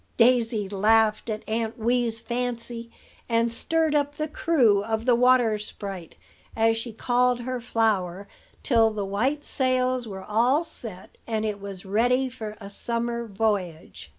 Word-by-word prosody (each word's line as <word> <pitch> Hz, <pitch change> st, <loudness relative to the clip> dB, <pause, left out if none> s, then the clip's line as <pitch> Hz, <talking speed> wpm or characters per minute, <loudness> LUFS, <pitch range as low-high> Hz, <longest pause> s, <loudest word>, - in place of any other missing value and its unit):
'" -, -, -37 dB
Daisy 230 Hz, -3 st, +3 dB
laughed 215 Hz, +3 st, +2 dB
at 215 Hz, 0 st, -4 dB
Aunt 225 Hz, +1 st, -2 dB
Wee's 235 Hz, 0 st, 0 dB
fancy, 235 Hz, -1 st, -4 dB, 0.4 s
and 230 Hz, 0 st, +2 dB
stirred 320 Hz, +5 st, 0 dB
up 290 Hz, -1 st, +1 dB
the 305 Hz, +1 st, -2 dB
crew 250 Hz, -11 st, +2 dB
of 220 Hz, +1 st, -2 dB
the 250 Hz, -, +4 dB
Water 245 Hz, -3 st, +4 dB
sprite, 195 Hz, -4 st, -7 dB, 0.4 s
as 225 Hz, 0 st, +3 dB
she 230 Hz, +1 st, -5 dB
called 245 Hz, +2 st, +1 dB
her 255 Hz, 0 st, -4 dB
flower, 205 Hz, -5 st, 0 dB, 0.4 s
till 225 Hz, -3 st, +4 dB
the 210 Hz, -2 st, -3 dB
white 255 Hz, +10 st, -1 dB
sails 255 Hz, -2 st, 0 dB
were 190 Hz, -2 st, -7 dB
all 240 Hz, -, +2 dB
set, 225 Hz, -, -10 dB
and 220 Hz, -1 st, -1 dB
it 205 Hz, -2 st, -3 dB
was 200 Hz, -2 st, -8 dB
ready 245 Hz, +6 st, +2 dB
for 220 Hz, -4 st, -7 dB
a 200 Hz, -, -9 dB
summer 235 Hz, +3 st, -3 dB
voyage. 195 Hz, -, -2 dB
230 Hz, 150 wpm, -25 LUFS, 210-250 Hz, 0.4 s, the